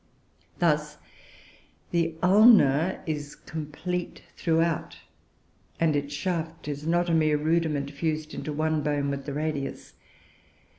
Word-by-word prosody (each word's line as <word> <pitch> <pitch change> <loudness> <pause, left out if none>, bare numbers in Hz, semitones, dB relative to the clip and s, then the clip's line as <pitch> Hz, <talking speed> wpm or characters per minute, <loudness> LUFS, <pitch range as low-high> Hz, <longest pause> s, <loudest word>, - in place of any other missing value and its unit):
Thus 150 -3 +1 0.9
the 165 -1 0
ulna 185 - +5
is 150 -2 -4
complete 165 +3 -5
throughout, 165 -1 0 0.8
and 160 -2 +2
its 145 0 -2
shaft 165 0 -3
is 145 +1 -4
not 175 +1 +2
a 170 - +1
mere 155 -2 +3
rudiment, 155 -2 0
fused 155 +1 -3
into 155 - -5
one 155 +1 0
bone 145 -1 0
with 140 0 -5
the 140 - -3
radius. 150 -2 -4
155 Hz, 115 wpm, -27 LUFS, 145-165 Hz, 0.9 s, ulna